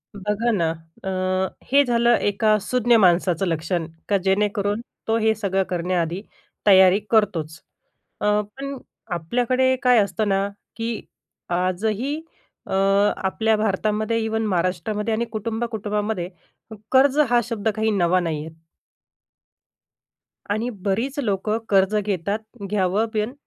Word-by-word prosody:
बघा 210 Hz, +4 st, -1 dB
ना, 170 Hz, -6 st, +1 dB, 0.3 s
अ, 190 Hz, -, -3 dB, 0.6 s
हे 285 Hz, +1 st, +6 dB
झालं 235 Hz, 0 st, +3 dB
एका 215 Hz, +1 st, +2 dB
सुज्ञ 240 Hz, -1 st, +3 dB
माणसाचं 180 Hz, -2 st, +3 dB
लक्षण, 165 Hz, 0 st, -1 dB, 0.2 s
का 200 Hz, -, +4 dB
जेणेकरून 205 Hz, +2 st, +1 dB, 0.3 s
तो 225 Hz, 0 st, +2 dB
हे 220 Hz, 0 st, +3 dB
सगळं 195 Hz, -2 st, 0 dB
करण्याआधी 175 Hz, 0 st, -1 dB, 0.5 s
तयारी 190 Hz, 0 st, +7 dB
करतोच. 170 Hz, -8 st, +1 dB, 0.6 s
अ, -, -, -1 dB, 0.3 s
पण 275 Hz, 0 st, -5 dB, 0.4 s
आपल्याकडे 250 Hz, +8 st, +1 dB
काय 250 Hz, -1 st, +5 dB
असतं 210 Hz, +1 st, -2 dB
ना, 195 Hz, 0 st, +1 dB, 0.3 s
की 230 Hz, 0 st, -3 dB, 0.6 s
आजही 215 Hz, -, -1 dB, 0.5 s
अ, -, -, -4 dB, 0.4 s
आपल्या 220 Hz, +3 st, +1 dB
भारतामध्ये, 215 Hz, +2 st, 0 dB
इव्हन 220 Hz, 0 st, -1 dB
महाराष्ट्रामध्ये 190 Hz, +4 st, -1 dB
आणि 235 Hz, +2 st, 0 dB
कुटुंब-कुटुंबामध्ये, 215 Hz, -3 st, -2 dB, 0.6 s
कर्ज 270 Hz, +2 st, +4 dB
हा 240 Hz, 0 st, +4 dB
शब्द 225 Hz, -2 st, -2 dB
काही 220 Hz, 0 st, +1 dB
नवा 185 Hz, -2 st, +2 dB
नाही 160 Hz, -3 st, -3 dB
आहे. 160 Hz, 0 st, -11 dB, 2.0 s
आणि 220 Hz, +4 st, 0 dB, 0.2 s
बरीच 240 Hz, +9 st, -1 dB
लोकं 215 Hz, -2 st, 0 dB
कर्ज 195 Hz, +1 st, +3 dB
घेतात, 200 Hz, 0 st, -1 dB, 0.3 s
घ्यावं 205 Hz, +2 st, +1 dB
पण, 215 Hz, +3 st, -1 dB
210 Hz, 120 wpm, -23 LUFS, 190-225 Hz, 2.0 s, तयारी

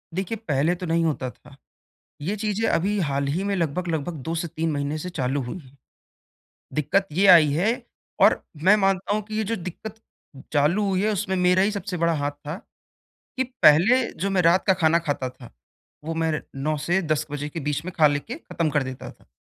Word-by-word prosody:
देखिए, 190 Hz, +4 st, -2 dB
पहले 150 Hz, +5 st, +2 dB
तो 180 Hz, +1 st, -6 dB
नहीं 165 Hz, 0 st, +1 dB
होता 140 Hz, -5 st, -1 dB
था। -, -, -17 dB, 0.7 s
ये 190 Hz, +8 st, -2 dB
चीज़ें 215 Hz, +1 st, -1 dB
अभी 200 Hz, +5 st, +1 dB
हाल 140 Hz, 0 st, -1 dB
ही 185 Hz, +4 st, -1 dB
में 200 Hz, 0 st, 0 dB
लगभग-लगभग 165 Hz, 0 st, -2 dB
2 165 Hz, -, -1 dB
से 170 Hz, +1 st, -2 dB
3 160 Hz, +1 st, -2 dB
महीने 145 Hz, +1 st, -2 dB
से 180 Hz, +4 st, -5 dB
चालू 135 Hz, -4 st, -1 dB
हुई 125 Hz, +8 st, -6 dB
हैं। 140 Hz, -4 st, -17 dB, 1.0 s
दिक्कत 195 Hz, +6 st, +1 dB
ये 190 Hz, +6 st, +3 dB
आई 165 Hz, -5 st, +8 dB
है, 180 Hz, +9 st, +2 dB, 0.5 s
और -, -, +5 dB, 0.2 s
मैं 195 Hz, +4 st, +7 dB
मानता 195 Hz, +1 st, +1 dB
हूँ 215 Hz, -, 0 dB
कि 215 Hz, +1 st, -7 dB
ये 220 Hz, -, 0 dB
जो -, -, +1 dB
दिक्कत 185 Hz, +3 st, -7 dB, 0.6 s
चालू 155 Hz, +8 st, +2 dB
हुई 190 Hz, -1 st, +1 dB
है 215 Hz, -, +2 dB
उसमें 200 Hz, -1 st, -1 dB
मेरा 180 Hz, +1 st, +3 dB
ही 200 Hz, +2 st, +2 dB
सबसे 200 Hz, -2 st, -4 dB
हाथ 160 Hz, -4 st, 0 dB
था 145 Hz, +2 st, -7 dB, 0.8 s
कि 260 Hz, -, +1 dB, 0.2 s
पहले 180 Hz, -, +6 dB, 0.2 s
जो 195 Hz, -, 0 dB
मैं 190 Hz, -2 st, +2 dB
रात 170 Hz, +2 st, +4 dB
का 190 Hz, -, +6 dB
खाना 160 Hz, +1 st, +5 dB
खाता 145 Hz, -6 st, -2 dB
था 125 Hz, -1 st, -14 dB, 0.5 s
वो 165 Hz, +1 st, -3 dB
मैं 160 Hz, -1 st, +1 dB, 0.3 s
9 155 Hz, 0 st, +1 dB
से 175 Hz, +5 st, +1 dB
10 155 Hz, -2 st, -1 dB
बजे 145 Hz, 0 st, -4 dB
के 165 Hz, +2 st, -6 dB
बीच 150 Hz, +1 st, -2 dB
में 185 Hz, -, -5 dB
खा 155 Hz, -2 st, +6 dB
ले 145 Hz, 0 st, +2 dB
के 225 Hz, +11 st, -7 dB
ख़त्म 170 Hz, -, -2 dB
कर 150 Hz, -1 st, +1 dB
देता 130 Hz, -1 st, -7 dB
था। -, -, -22 dB
170 Hz, 205 wpm, -24 LUFS, 150-195 Hz, 1.0 s, आई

